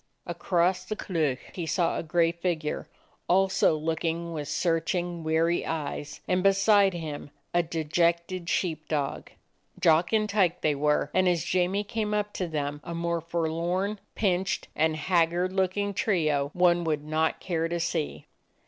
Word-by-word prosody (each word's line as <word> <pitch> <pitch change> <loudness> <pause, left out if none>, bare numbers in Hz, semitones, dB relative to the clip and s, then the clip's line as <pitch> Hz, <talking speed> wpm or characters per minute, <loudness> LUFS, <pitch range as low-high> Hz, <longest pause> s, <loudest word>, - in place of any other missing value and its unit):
Across 175 +1 0
the 215 - -3
Cleuch 155 -10 -1 0.2
he 170 -3 -4
saw 170 +2 +1
a - - -1
gray 165 +1 +2
figure, 170 -3 -3 0.4
also 190 -3 +3
looking 165 +2 -2
with 150 -2 -4
searching 170 +1 -1
weary 165 +2 +1
eyes, 150 -2 -4
and 180 0 +2
beside 195 0 +4
him 155 -4 -6 0.2
a 175 - +4
dejected 170 +2 0
sheep 160 -4 -1
dog. 145 -3 -2 0.5
Jock 165 +2 +4
and 215 -1 +2
Tyke 195 -4 +1
they 155 - +2
were, 150 +1 +1
and 185 -1 +3
as 170 -2 +1
Jamie 185 +3 +1
came 210 0 -2
up 210 0 -1
to 180 - -2
them 145 -2 -3
a 170 -1 -5
more 170 0 -1
forlorn, 170 +5 -1 0.2
pinched, 190 -2 0
and 160 0 +2
haggard 175 +2 +1
looking 195 +2 0
trio 155 - +1
one 175 -1 +4
would 155 -3 -1
not 155 +1 0
care 165 -3 -1
to 170 +1 -2
see. 165 -2 -2
170 Hz, 150 wpm, -27 LUFS, 160-185 Hz, 0.5 s, beside